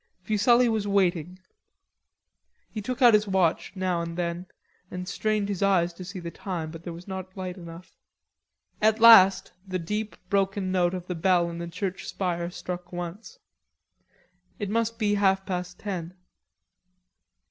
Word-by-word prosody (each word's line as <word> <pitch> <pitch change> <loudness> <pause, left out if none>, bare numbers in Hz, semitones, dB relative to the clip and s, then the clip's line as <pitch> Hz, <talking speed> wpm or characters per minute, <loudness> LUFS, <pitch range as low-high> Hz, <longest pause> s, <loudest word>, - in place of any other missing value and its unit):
Fuselli 235 +5 +4
was 220 -3 0
waiting. 180 -3 +1 1.3
He 215 - -5
took 255 +5 -2
out 240 -2 +8
his 210 0 +4
watch 185 -5 +1
now 185 -2 -1
and 170 0 -5
then 175 +1 -3 0.4
and 180 0 -6
strained 215 +2 -1
his 200 -2 -3
eyes 180 -3 +2
to 185 - -9
see 185 +1 -7
the 170 -1 -6
time, 165 -5 -5
but 165 0 -9
there 175 - -6
was 170 +3 -10
not 190 0 -7
light 185 -1 -4
enough. 170 -1 -11 0.9
At 220 +1 +3
last 195 -5 +8 0.2
the 185 -1 -2
deep 210 +5 -4
broken 195 -1 0
note 180 -1 +1
of 180 -1 -6
the 180 - -4
bell 175 0 +2
in 170 - -7
the 170 - -5
church 180 +2 -4
spire 175 -2 -2
struck 180 0 -7
once. 175 - -7 1.2
It 205 -1 -4
must 230 0 0
be 210 -2 +1
half 195 -1 +2
past 180 -2 -4
ten. 180 -4 -5
185 Hz, 160 wpm, -26 LUFS, 175-205 Hz, 1.3 s, out